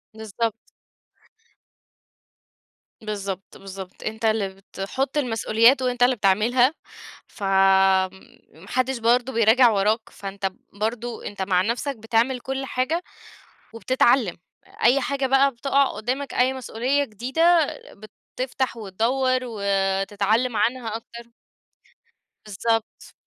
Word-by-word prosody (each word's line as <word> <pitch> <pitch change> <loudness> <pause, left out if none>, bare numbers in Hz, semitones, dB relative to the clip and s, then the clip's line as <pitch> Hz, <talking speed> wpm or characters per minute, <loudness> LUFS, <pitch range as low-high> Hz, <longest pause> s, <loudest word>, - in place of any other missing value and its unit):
بالضبط. 220 +1 -3 2.5
بالضبط، 200 -3 -6
بالضبط. 195 -1 -10
أنت 220 +1 -4
اللي 215 -3 +1
بتحُط 195 +8 -5
المسؤوليات 235 0 +3
وأنت 245 -1 +1
اللي 250 +1 +4
بتعملها، 235 +6 +3 0.5
فم 205 - -7 1.1
ما 160 +4 -16
حدّش 255 +3 0
برضه 240 +3 +1
بيراجع 230 +2 +5
وراك، 215 +2 0
فأنت 195 0 -7
ب 190 - -3 0.2
برضه 225 +3 -4
أنت 205 -1 -7
مع 185 -1 +2
نفسك 240 +7 -2
بتعمل 230 +4 0
كل 265 +2 -4
حاجة 270 +7 -1 0.7
وبتتعلّم. 240 -3 +2 0.5
أي 255 +4 +5
حاجة 275 0 -1
بقى 270 +1 +4
بتقع 275 +3 +1
قُدّامك، 255 +4 -4
أي 255 +1 +2
مسؤولية 260 +2 -1
جديدة، 295 - +2 0.7
بتفتح 255 -1 -2
وتدوَّر 240 +6 0
وتتعلَم 200 +2 0
عنها 225 +1 -1
أكتر. 235 +1 -10 1.1
بالضبط. 225 +2 -3
230 Hz, 105 wpm, -23 LUFS, 210-255 Hz, 2.5 s, بيراجع